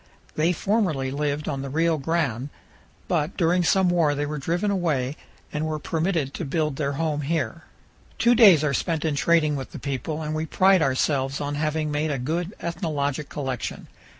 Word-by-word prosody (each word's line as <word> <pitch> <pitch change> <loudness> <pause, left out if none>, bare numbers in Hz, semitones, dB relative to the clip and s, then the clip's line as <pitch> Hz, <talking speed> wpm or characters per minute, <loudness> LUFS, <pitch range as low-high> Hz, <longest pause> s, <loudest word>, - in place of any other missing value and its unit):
They 160 +3 +2
formerly 180 -9 0
lived 145 +1 -2
on 135 -2 -2
the 135 - -5
Rio 160 +2 +1
Grande, 140 -4 -1 0.6
but 160 -4 -1
during 175 +1 +3
some 190 +2 +3
war 165 -4 +2
they 145 +1 -1
were 150 0 -4
driven 175 +8 0
away 150 -8 0 0.4
and 150 0 -1
were 155 -1 -2
permitted 160 -2 -1
to - - -4
build 150 -1 -1
their 140 -2 -1
home 150 0 -1
here. 160 +2 -2 0.5
Two 240 - +4
days 200 - +7
are 145 -2 +1
spent 160 +2 -1
in 155 - +1
trading 155 0 +2
with 135 -1 -6
the - - -6
people, 145 +3 -3
and 155 0 -3
we 155 +1 -2
pride 190 +2 +4
ourselves 135 0 +1
on 145 0 -3
having 155 +1 -1
made 150 +1 0
a 145 - -1
good 165 - -3
ethnologic 150 -5 -2
collection. 135 -4 -4
155 Hz, 180 wpm, -24 LUFS, 140-170 Hz, 0.6 s, days